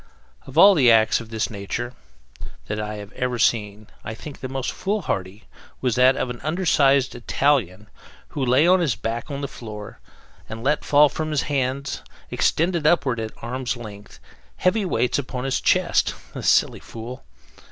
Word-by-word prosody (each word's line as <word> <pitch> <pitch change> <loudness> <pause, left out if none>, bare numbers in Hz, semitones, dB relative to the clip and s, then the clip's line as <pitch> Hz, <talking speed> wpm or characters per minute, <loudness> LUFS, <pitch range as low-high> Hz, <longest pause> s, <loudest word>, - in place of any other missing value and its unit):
Of 135 - -9
all 200 +4 +9
the 135 -9 +5
acts 110 -1 +5
of 115 - -11
this 110 0 -2
nature 110 +4 -4 0.7
that 105 0 -4
I 105 0 -4
have 105 -1 -9
ever 125 -1 -2
seen 105 -2 0 0.2
I 110 - -6
think 145 +5 -10
the 130 - -6
most 135 -1 -3
foolhardy 115 - -3 0.4
was 125 -3 0
that 125 +2 +5
of 125 - -2
an 120 - -8
under 170 +6 -2
sized 140 -4 +3
Italian 120 -5 0 0.4
who 140 - -3
lay 130 +5 +4
on 185 +1 +5
his 150 -10 +1
back 115 +5 -4
on 140 -1 -4
the 140 - -2
floor 105 -5 -9 0.5
and 110 +1 -7
let 150 +3 +1
fall 150 +1 +5
from 155 +2 -4
his 150 -2 0
hands, 135 -1 -2 0.3
extended 170 -1 +1
upward 140 -8 +2
at 110 -1 -3
arm's 125 +1 -3
length 105 -3 -11 0.4
heavy 195 +3 +1
weights 135 -7 0
upon 125 -2 -5
his 135 -1 -1
chest - - +2 0.2
the - - -6
silly - - +3
fool! 115 - -9
125 Hz, 175 wpm, -23 LUFS, 110-145 Hz, 0.7 s, all